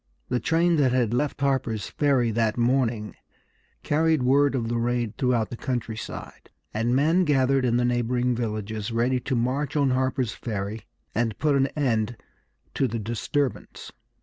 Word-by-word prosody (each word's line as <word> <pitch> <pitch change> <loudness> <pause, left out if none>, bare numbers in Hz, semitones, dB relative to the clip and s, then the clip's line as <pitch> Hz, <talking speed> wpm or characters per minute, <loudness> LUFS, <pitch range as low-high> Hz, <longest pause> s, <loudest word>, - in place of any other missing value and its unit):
The 125 - +1
train 165 +3 +2
that 135 -4 +3
had 120 -3 +1
left 140 +2 -1
Harper's 130 -6 0
Ferry 135 -6 +1
that 110 0 0
morning 120 -3 0 0.7
carried 160 -2 +2
word 140 +2 +3
of 115 -3 -1
the 120 0 -1
raid 120 -2 -1
throughout 120 -2 0
the - - -4
countryside, 115 -2 -5 0.2
and 115 +3 +1
men 160 +7 +3
gathered 135 -3 +2
in 120 -1 +2
the 120 - +2
neighboring 125 +1 +1
villages 110 -2 -3
ready 120 +3 +1
to 130 +1 -2
march 130 +5 -1
on 140 -3 +3
Harper's 130 -3 0
Ferry 105 -1 -4 0.3
and 115 -2 -1
put 150 -1 +2
an 135 0 +3
end 120 -5 0 0.6
to 135 - +1
the 115 0 -3
disturbance. 120 +5 -3
125 Hz, 155 wpm, -25 LUFS, 115-135 Hz, 0.7 s, that